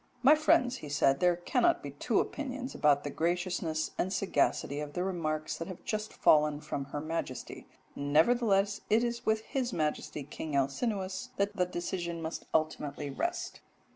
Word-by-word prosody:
'My 275 +4 +8
friends,' 310 -5 +3
he 150 - -8
said, 135 -1 +3
'there 180 -1 +4
cannot 320 - +2
be - - -5
two - - 0
opinions 265 -2 -3
about 145 -1 +3
the 145 - -4
graciousness 170 -1 -1
and 185 - 0
sagacity 145 -6 +1
of 150 -1 -5
the 180 - -1
remarks 155 -5 -2
that 165 - -5
have 185 -3 -9
just 215 0 -2
fallen 150 -1 +4
from 140 -2 -4
Her 140 +2 -5
Majesty; 155 -4 -5 0.3
nevertheless 195 +7 +3
it 220 +2 +4
is 235 0 -3
with 220 0 +3
His 250 +1 -2
Majesty 150 -3 -2
King 145 +1 -5
Alcinous 190 - -1
that 200 +1 0
the 180 -3 +1
decision 175 -1 -3
must 160 0 -5
ultimately 150 -2 -1
rest.' - - -3
175 Hz, 165 wpm, -31 LUFS, 150-215 Hz, 0.3 s, My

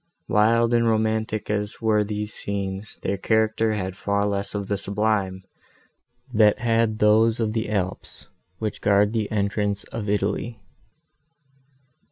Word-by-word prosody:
Wild 115 +1 +3
and 115 -1 +3
romantic 110 -1 0
as 105 0 -2
were 110 -2 +2
these 105 0 -4
scenes, 100 0 -4
their 100 - -1
character 110 +2 +1
had 95 -3 -3
far 100 +1 0
less 100 0 -1
of 100 -1 -2
the 100 - 0
sublime, 100 -2 -1 0.9
that 105 -2 +5
had 115 -2 +1
those 110 +2 +4
of 110 -2 0
the 110 -2 -2
Alps, 95 -3 -4 0.3
which 110 -1 -4
guard 100 +1 +3
the 110 -3 -1
entrance 100 -1 -1
of 105 -3 -4
Italy. 105 +3 -1
105 Hz, 135 wpm, -24 LUFS, 100-110 Hz, 0.9 s, that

